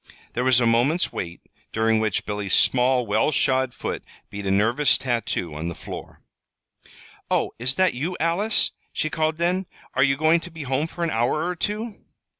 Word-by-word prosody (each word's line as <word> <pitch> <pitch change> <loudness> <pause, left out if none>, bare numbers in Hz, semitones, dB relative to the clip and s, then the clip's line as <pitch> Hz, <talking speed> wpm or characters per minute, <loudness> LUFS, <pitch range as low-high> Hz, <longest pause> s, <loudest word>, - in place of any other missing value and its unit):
There 125 - -1
was 130 -2 +5
a 120 - +2
moment's 120 +9 +2
wait, 85 -1 -5 0.3
during 110 0 +2
which 110 -3 -1
Billy's 105 -2 -1
small, 125 0 +3
well 110 +7 +2
shod 130 -2 +2
foot - - -5 0.3
beat 100 -1 -5
a - - +1
nervous 115 +8 +3
tattoo 115 - -2
on 80 +2 -4
the 85 - -4
floor. - - -9 1.1
"Oh, - - +1
is 130 +3 +2
that 185 0 +3
you, 160 +9 -3
Alice?" 175 +7 +2 0.2
she 155 - -2
called 155 0 0
then. 180 +2 0 0.3
"Are 130 - +1
you 135 0 +4
going 155 +3 +4
to 170 - -9
be 165 -2 -8
home 135 +3 0
for 170 +1 -5
an 165 - 0
hour 120 +8 +1
or 180 0 -2
two?" 210 +4 -3
130 Hz, 185 wpm, -24 LUFS, 115-165 Hz, 1.1 s, was